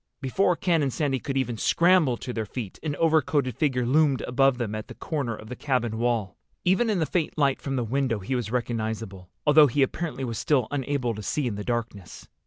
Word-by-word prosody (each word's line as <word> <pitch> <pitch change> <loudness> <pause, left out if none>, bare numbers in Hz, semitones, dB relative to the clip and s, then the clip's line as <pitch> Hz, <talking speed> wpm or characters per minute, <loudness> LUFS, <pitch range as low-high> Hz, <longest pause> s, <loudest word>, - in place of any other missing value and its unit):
Before 175 +8 +1
Ken 165 -2 +1
and 140 -2 0
Sandy 135 -1 -1
could 135 +2 -3
even 120 -3 -1
scramble 170 -3 +3
to 125 - -6
their 110 -2 -3
feet 110 -3 -6
an 150 -3 -3
overcoated 150 -6 +2
figure 130 -3 0
loomed 140 +1 +3
above 135 +1 +2
them 115 -4 -3
at 110 0 -5
the - - -10
corner 140 -8 -3
of 110 - -11
the 125 - -6
cabin 120 -5 -1
wall. 115 -5 0 0.3
Even 190 +6 +3
in 210 - +1
the 160 - +1
faint 160 -1 -2
light 140 -3 +2
from 135 -1 -3
the 125 - 0
window 125 0 0
he 100 +6 -4
was 120 -4 -2
recognizable, 110 -5 -3 0.2
although 150 0 +7
he 140 +2 +2
apparently 150 0 -3
was 115 -3 -3
still 130 -7 +2
unable 135 -3 -1
to 105 - -7
see 140 +8 -1
in 120 - -1
the 105 0 -5
darkness. 115 -6 -4
130 Hz, 215 wpm, -26 LUFS, 115-145 Hz, 0.3 s, although